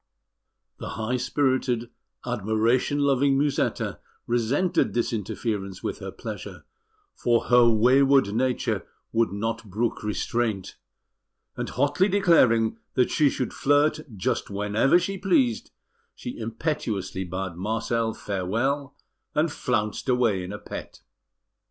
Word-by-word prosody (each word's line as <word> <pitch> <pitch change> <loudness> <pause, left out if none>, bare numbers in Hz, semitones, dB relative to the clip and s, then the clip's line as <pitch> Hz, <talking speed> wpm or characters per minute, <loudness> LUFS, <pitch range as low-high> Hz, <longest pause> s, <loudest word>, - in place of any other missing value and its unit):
The - - -6
high 110 +3 -1
spirited, 125 -2 0 0.3
admiration 115 +4 +1
loving 140 -1 +3
Musetta 145 0 0 0.3
resented 120 +11 +1
this 120 0 0
interference 105 -2 -3
with - - -3
her - - -6
pleasure, - - -8 0.5
for 120 -1 +1
her 120 -1 +6
wayward 130 +1 +4
nature 125 +2 0 0.3
would 115 -2 +2
not 110 +2 -3
brook 110 +5 -1
restraint; 105 -1 -2 0.8
and - - -4
hotly 145 +8 +2
declaring 130 - +3 0.2
that 125 - +2
she 150 -2 +4
should 130 -2 -3
flirt 145 +2 +3 0.2
just 95 - -1
whenever 105 +9 +2
she 195 +2 -2
pleased, 140 - +2 0.5
she 120 - -6
impetuously 115 - -3
bade 95 0 -4
Marcel 110 +4 -1
farewell, 115 +9 -2 0.4
and 155 +1 +2
flounced 105 -2 -2
away 115 -7 +2
in 90 - -6
a 105 - -5
pet. 105 - -9
120 Hz, 115 wpm, -25 LUFS, 105-135 Hz, 0.8 s, her